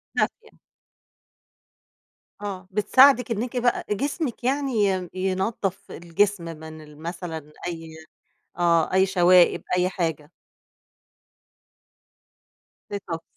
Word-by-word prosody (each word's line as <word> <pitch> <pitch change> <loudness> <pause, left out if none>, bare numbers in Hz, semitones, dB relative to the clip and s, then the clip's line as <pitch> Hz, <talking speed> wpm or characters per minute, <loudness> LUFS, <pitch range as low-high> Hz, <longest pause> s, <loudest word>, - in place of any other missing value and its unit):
دافية. 455 - -2 1.9
آه، 195 -2 -6
بتساعدِك 250 +4 +5
إنِّكِ 235 +3 -2
بقى 245 0 +1
جسمِك 275 - -2
يعني 275 +2 0
ي 185 -2 -1
ينضف 190 +1 -2
الجسم 175 +3 0
من 160 -1 -9
ال 150 -1 -15
مثلًا 165 -3 -6 0.2
أي 165 -2 -6 0.7
آه، 170 -1 +3
أي 190 +1 +4
شوائب 180 -1 +4
أي 180 0 +2
حاجة. 160 -5 -3 2.6
ديتوكس. 185 -5 -5
185 Hz, 90 wpm, -24 LUFS, 170-210 Hz, 2.6 s, بتساعدِك